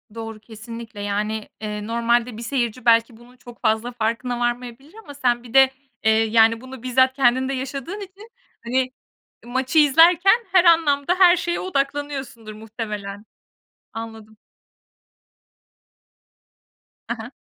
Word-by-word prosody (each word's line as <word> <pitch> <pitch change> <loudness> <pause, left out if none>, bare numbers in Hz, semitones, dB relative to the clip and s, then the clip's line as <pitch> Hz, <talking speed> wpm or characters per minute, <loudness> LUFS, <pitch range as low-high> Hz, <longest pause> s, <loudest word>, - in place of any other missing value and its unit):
Doğru, 225 -1 -7
kesinlikle, 225 0 -10
yani, 210 +1 -3
eee, 210 -1 -5
normalde 235 0 0
bir - - -8
seyirci 240 -1 -3
belki 230 0 +3
bunun 245 +2 -19
çok 240 -1 -15
fazla 220 +1 0
farkına 240 +1 -2
varmayabilir 245 +4 -4
ama 285 - -11
sen 245 -4 0
bir 240 -1 -13
de, 265 -1 +6 0.3
eee, 220 - +4
yani, 225 +1 +3
bunu 260 -1 -11
bizzat 260 +1 +3
kendin 260 0 +2
de - - -2
yaşadığın 275 +8 -5
için, 400 +3 -12 0.3
hani, 255 +2 -1 0.5
maçı 260 +5 0
izlerken 345 - +5
her 370 -1 +5
anlamda 325 -1 +3
her 365 -1 +6
şeye 345 0 -2
odaklanıyorsundur 275 -8 -4
muhtemelen. 210 -2 -7 0.7
Anladım. 225 -1 -9 2.7
He 235 - -1
he. 230 +3 -10
240 Hz, 125 wpm, -22 LUFS, 225-275 Hz, 2.7 s, de